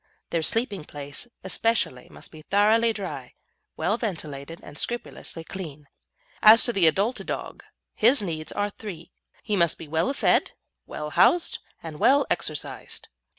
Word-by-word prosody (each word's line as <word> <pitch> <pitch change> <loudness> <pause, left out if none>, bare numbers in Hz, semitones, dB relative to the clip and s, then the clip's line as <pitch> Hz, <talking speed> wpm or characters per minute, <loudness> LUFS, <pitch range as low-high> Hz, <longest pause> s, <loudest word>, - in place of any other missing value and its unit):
Their 165 - +1
sleeping 205 -1 0
place 145 - -7 0.2
especially 190 - 0
must - - -11
be 155 - -12
thoroughly 215 +6 +4
dry, 155 - -6 0.4
well 220 - +1
ventilated, 165 - -5
and 145 - -11
scrupulously 235 -5 -4
clean. 155 -6 -8 0.5
As 220 +2 +9
to 240 - +2
the 185 -6 +4
adult 200 +9 +2
dog, - - -5 0.3
his 245 +5 +5
needs 160 -6 -3
are 205 0 -1
three: 185 -6 -9 0.3
he 210 - 0
must 170 -4 +3
be 160 - -9
well 160 - +1
fed, - - +2 0.3
well 150 0 -5
housed, 345 - +4 0.2
and 155 -2 -7
well 280 +1 +5
exercised. 155 -4 -3
180 Hz, 145 wpm, -26 LUFS, 155-220 Hz, 0.5 s, As